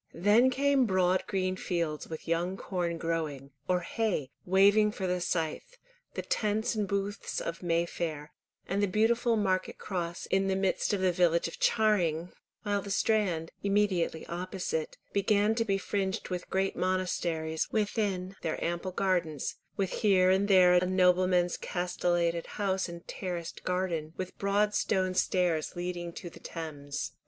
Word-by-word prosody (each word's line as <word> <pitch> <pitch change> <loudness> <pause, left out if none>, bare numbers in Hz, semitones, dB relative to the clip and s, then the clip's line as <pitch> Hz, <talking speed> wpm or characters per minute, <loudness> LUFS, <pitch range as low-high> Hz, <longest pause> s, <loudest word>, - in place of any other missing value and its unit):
Then 210 +8 +5
came 275 -1 +2
broad 185 -1 +2
green 185 -1 0
fields 170 -5 -2
with 160 - -8
young 175 +3 0
corn 175 -4 -2
growing, 155 -5 -3 0.2
or 180 -1 +2
hay 175 - -1 0.2
waving 200 +3 +5
for 190 - -3
the 180 0 0
scythe, 165 - -2 0.4
the - - -3
tents 215 +1 0
and 210 -2 -1
booths 200 +1 -2
of 170 - -5
May 170 -1 +1
Fair, 155 -3 -5 0.3
and 195 +2 0
the 205 - +3
beautiful 230 +4 +2
Market 190 -3 0
Cross 175 -3 -4
in 195 0 +2
the 190 - +1
midst 190 +2 0
of 200 -2 0
the 185 -1 +3
village 170 -1 +2
of 165 - -9
Charing, 180 -6 +2 0.3
while 205 -1 0
the 200 - -8
Strand, 195 -6 +1
immediately 200 -5 +1
opposite, 175 -2 -3 0.2
began 205 +1 +3
to 230 0 +1
be 195 -2 +1
fringed 195 +1 -2
with 180 -1 -4
great 190 0 0
monasteries 170 -4 -1
within 200 -3 -1
their 160 - -2
ample 175 +2 -2
gardens, 175 -7 -1 0.2
with 195 -2 0
here 185 -3 +4
and 195 +2 +2
there 185 -3 +6
a 180 0 +4
nobleman's 180 -1 +3
castellated 175 -1 -1
house 190 -3 0
and 170 0 -10
terraced 175 -3 -5
garden, 175 -4 -1
with 185 -1 -5
broad 205 +1 +2
stone 185 -3 +1
stairs 180 -4 +1
leading 175 -1 -4
to 175 - -8
the - - -13
Thames. 145 -4 -5
185 Hz, 155 wpm, -30 LUFS, 170-200 Hz, 0.4 s, there